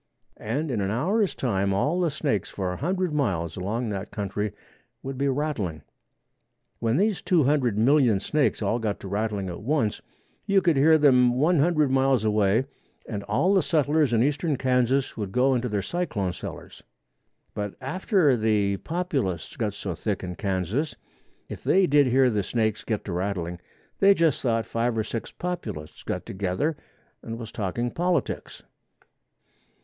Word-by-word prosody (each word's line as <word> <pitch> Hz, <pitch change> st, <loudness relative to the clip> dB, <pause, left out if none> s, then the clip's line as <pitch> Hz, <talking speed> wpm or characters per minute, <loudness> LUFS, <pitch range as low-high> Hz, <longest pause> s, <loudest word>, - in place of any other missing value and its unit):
And 140 Hz, +8 st, -2 dB
in 110 Hz, -5 st, -1 dB
an 95 Hz, -, -1 dB
hour's 185 Hz, -, +1 dB
time 100 Hz, -5 st, 0 dB
all 150 Hz, -, +1 dB
the 175 Hz, -2 st, +2 dB
snakes 140 Hz, -, -1 dB
for 95 Hz, -2 st, -3 dB
a -, -, -6 dB
hundred 180 Hz, +2 st, -1 dB
miles 90 Hz, -, -1 dB
along 110 Hz, +6 st, -2 dB
that 100 Hz, 0 st, -4 dB
country 105 Hz, 0 st, -3 dB, 0.5 s
would 135 Hz, 0 st, -5 dB
be 140 Hz, +2 st, 0 dB
rattling. 130 Hz, -, -2 dB, 1.0 s
When 115 Hz, +1 st, +1 dB
these 205 Hz, +1 st, +1 dB
two 175 Hz, -5 st, +3 dB
hundred 130 Hz, -6 st, +2 dB
million 120 Hz, -3 st, +4 dB
snakes 140 Hz, +1 st, 0 dB
all 110 Hz, +4 st, +1 dB
got 110 Hz, -3 st, -2 dB
to -, -, -7 dB
rattling 105 Hz, -1 st, -2 dB
at 90 Hz, 0 st, -6 dB
once 115 Hz, -3 st, 0 dB, 0.5 s
you 200 Hz, -1 st, +4 dB
could 170 Hz, -4 st, +2 dB
hear 155 Hz, +4 st, +6 dB
them 125 Hz, -5 st, +5 dB
one 160 Hz, +4 st, +3 dB
hundred 155 Hz, -2 st, +3 dB
miles 135 Hz, -4 st, +2 dB
away 105 Hz, +3 st, +2 dB, 0.4 s
and 105 Hz, -3 st, -4 dB
all 180 Hz, -, +2 dB
the 190 Hz, -, +4 dB
settlers 150 Hz, -3 st, +2 dB
in 115 Hz, 0 st, +3 dB
eastern 145 Hz, +1 st, 0 dB
Kansas 130 Hz, +1 st, +1 dB
would 105 Hz, -3 st, -4 dB
go 130 Hz, +5 st, +3 dB
into 125 Hz, -1 st, -1 dB
their 105 Hz, -2 st, -1 dB
cyclone 110 Hz, -, -2 dB
cellars. -, -, -9 dB, 0.7 s
But 105 Hz, -2 st, -4 dB
after 155 Hz, -, +2 dB
the 105 Hz, -3 st, +1 dB
Populists 135 Hz, -, -3 dB
got 105 Hz, -3 st, -2 dB
so 95 Hz, -3 st, -4 dB
thick 95 Hz, +5 st, -3 dB
in 90 Hz, -1 st, -4 dB
Kansas, 100 Hz, -, -2 dB, 0.5 s
if -, -, -8 dB
they 190 Hz, 0 st, +4 dB
did 145 Hz, -4 st, +4 dB
hear 130 Hz, 0 st, +4 dB
the 105 Hz, -2 st, +1 dB
snakes 110 Hz, +1 st, -1 dB
get 110 Hz, -2 st, -3 dB
to 100 Hz, -, -4 dB
rattling, 90 Hz, -2 st, -3 dB, 0.4 s
they 200 Hz, 0 st, +6 dB
just 165 Hz, -5 st, +2 dB
thought 115 Hz, -3 st, 0 dB
five 115 Hz, 0 st, -1 dB
or 110 Hz, -, +1 dB
six 115 Hz, +1 st, -5 dB
Populists 175 Hz, -, -5 dB
got -, -, -4 dB
together 100 Hz, -, -1 dB, 0.5 s
and 115 Hz, 0 st, -6 dB
was 115 Hz, -2 st, -8 dB
talking 120 Hz, +4 st, -2 dB
politics. 175 Hz, -4 st, -2 dB
120 Hz, 165 wpm, -25 LUFS, 100-150 Hz, 1.0 s, hear